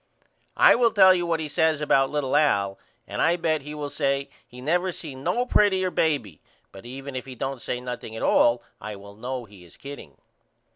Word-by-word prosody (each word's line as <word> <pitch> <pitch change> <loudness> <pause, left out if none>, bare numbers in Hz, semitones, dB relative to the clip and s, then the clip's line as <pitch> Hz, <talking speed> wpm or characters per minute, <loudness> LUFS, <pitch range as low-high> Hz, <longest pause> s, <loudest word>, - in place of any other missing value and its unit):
I - - +7
will 235 -1 +4
tell 190 -3 +7
you 175 -1 -1
what 165 -1 0
he 155 - -3
says 160 0 +1
about 135 -3 +3
little 145 -2 -1
Al 100 -10 +2 0.3
and - - -3
I 170 - +4
bet 160 -3 0
he 150 +2 -8
will 145 -1 -5
say 140 -1 -1 0.2
he 125 - -13
never 175 +7 0
seen 140 -6 -9
no 245 +10 0
prettyer 190 -6 +2
baby 145 - -1 0.3
but 95 +4 -12
even 135 +2 -8
if 130 +1 -5
he 130 - -8
don't 135 0 -4
say 125 - -3
nothing 125 -3 -7
at - - -5
all 120 0 +3 0.2
I 105 0 -6
will 100 0 -12
know 125 +2 -5
he 100 -4 -16
is 85 - -17
kidding. 140 - -10
140 Hz, 205 wpm, -25 LUFS, 125-160 Hz, 0.3 s, I